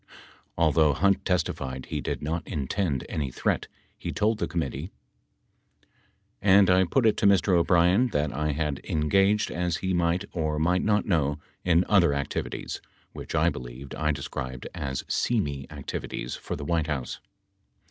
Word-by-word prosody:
Although 80 Hz, -2 st, +4 dB
Hunt 100 Hz, +7 st, +2 dB
testified 70 Hz, -8 st, -1 dB
he -, -, -3 dB
did -, -, -3 dB
not 80 Hz, +3 st, -3 dB
intend 75 Hz, 0 st, -1 dB
any 70 Hz, -4 st, -2 dB
threat, -, -, -1 dB, 0.3 s
he -, -, -4 dB
told 110 Hz, +1 st, +1 dB
the -, -, 0 dB
committee: 80 Hz, -1 st, -3 dB, 1.5 s
And 100 Hz, -1 st, +6 dB
I 95 Hz, +1 st, +5 dB
put 120 Hz, +8 st, +1 dB
it 110 Hz, -, +4 dB
to 100 Hz, -, +3 dB
Mr. 100 Hz, -1 st, +4 dB
O'Brien 90 Hz, +5 st, +4 dB
that 75 Hz, -, -1 dB
I 75 Hz, +2 st, -1 dB
had 75 Hz, -2 st, -2 dB
engaged 95 Hz, +7 st, +2 dB
as 90 Hz, -1 st, -1 dB
he 95 Hz, 0 st, -2 dB
might 85 Hz, 0 st, +1 dB
or 80 Hz, -3 st, -1 dB
might 90 Hz, +4 st, +2 dB
not 105 Hz, -1 st, +2 dB
know, 75 Hz, -6 st, +1 dB, 0.3 s
in 90 Hz, 0 st, +3 dB
other 85 Hz, -8 st, +4 dB
activities, 70 Hz, 0 st, -4 dB, 0.3 s
which -, -, -6 dB
I -, -, +4 dB
believed 65 Hz, +2 st, -8 dB
I 75 Hz, 0 st, 0 dB
described 65 Hz, -3 st, -5 dB
as 65 Hz, -1 st, -4 dB
seamy 70 Hz, -, -1 dB
activities, -, -, -5 dB
for -, -, -5 dB
the 70 Hz, -, -6 dB
White 80 Hz, -1 st, 0 dB
House. 65 Hz, -5 st, -3 dB
80 Hz, 155 wpm, -27 LUFS, 70-95 Hz, 1.5 s, And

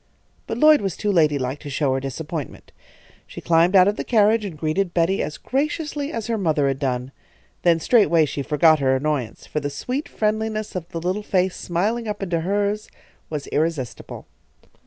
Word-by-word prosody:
But 225 Hz, -, -3 dB
Lloyd 305 Hz, +1 st, +6 dB
was 195 Hz, -4 st, -3 dB
too 210 Hz, -, 0 dB
ladylike 145 Hz, -6 st, +1 dB
to 145 Hz, -, -8 dB
show 140 Hz, -1 st, 0 dB
her 135 Hz, -, 0 dB
disappointment. 145 Hz, +1 st, -6 dB, 0.6 s
She -, -, -9 dB
climbed 170 Hz, +3 st, +3 dB
out 185 Hz, 0 st, +7 dB
of 205 Hz, -, 0 dB
the -, -, -2 dB
carriage 220 Hz, -1 st, +3 dB
and 185 Hz, -7 st, -6 dB
greeted 170 Hz, +4 st, -1 dB
Betty 175 Hz, +3 st, +2 dB
as 150 Hz, -, -4 dB
graciously 295 Hz, +1 st, -2 dB
as 230 Hz, -2 st, -4 dB
her 230 Hz, -2 st, -1 dB
mother 155 Hz, -6 st, +1 dB
had 135 Hz, -1 st, -1 dB
done. 130 Hz, -2 st, -2 dB, 0.5 s
Then 170 Hz, -2 st, +3 dB
straightway 170 Hz, -5 st, +4 dB
she 145 Hz, -, -4 dB
forgot 155 Hz, +2 st, +4 dB
her 130 Hz, -1 st, +2 dB
annoyance, 130 Hz, -4 st, -2 dB
for 150 Hz, -, -3 dB
the 145 Hz, -1 st, -3 dB
sweet 250 Hz, -, -4 dB
friendliness 215 Hz, 0 st, -2 dB
of 175 Hz, -2 st, -5 dB
the 165 Hz, -, -5 dB
little 185 Hz, +5 st, -2 dB
face 185 Hz, -2 st, 0 dB
smiling 215 Hz, +7 st, -1 dB
up 205 Hz, -1 st, -4 dB
into 175 Hz, -3 st, -1 dB
hers 205 Hz, +4 st, -1 dB, 0.4 s
was 150 Hz, -2 st, -4 dB
irresistible. 150 Hz, -5 st, -3 dB
170 Hz, 180 wpm, -22 LUFS, 150-210 Hz, 0.6 s, out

